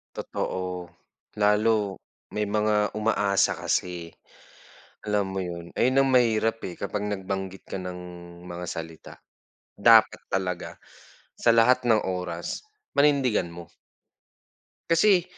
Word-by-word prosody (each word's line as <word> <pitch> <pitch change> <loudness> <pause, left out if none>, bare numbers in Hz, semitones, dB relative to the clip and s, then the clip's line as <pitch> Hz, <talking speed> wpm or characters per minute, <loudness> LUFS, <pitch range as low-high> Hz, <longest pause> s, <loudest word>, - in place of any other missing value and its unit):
Totoo, 90 -1 -4 0.5
lalo 105 -1 +2 0.3
may 105 0 -2
mga 105 0 +1
umaasa 105 -2 +1
kasi, 85 -2 -2 0.9
alam 105 -2 -1
mo 95 - -2
yun. 85 -1 -6
Ayun 130 +2 +3
ang 135 - +1
mahirap 115 -2 +3
eh, 90 - -8
kapag 105 +1 -3
nagbanggit 95 -1 -4
ka 95 - -5
ng 90 -1 -6 0.5
mga 90 0 -6
salita. 80 -1 -7 0.6
Dapat - - +6
talaga 90 -2 -3 0.5
sa 115 -1 +2
lahat 125 +2 +4
ng 110 -2 +4
oras 90 -2 -3 0.3
panindigan 135 -10 +3
mo. 85 0 -10 1.2
Kasi 180 +1 +5
100 Hz, 110 wpm, -26 LUFS, 90-115 Hz, 1.2 s, Dapat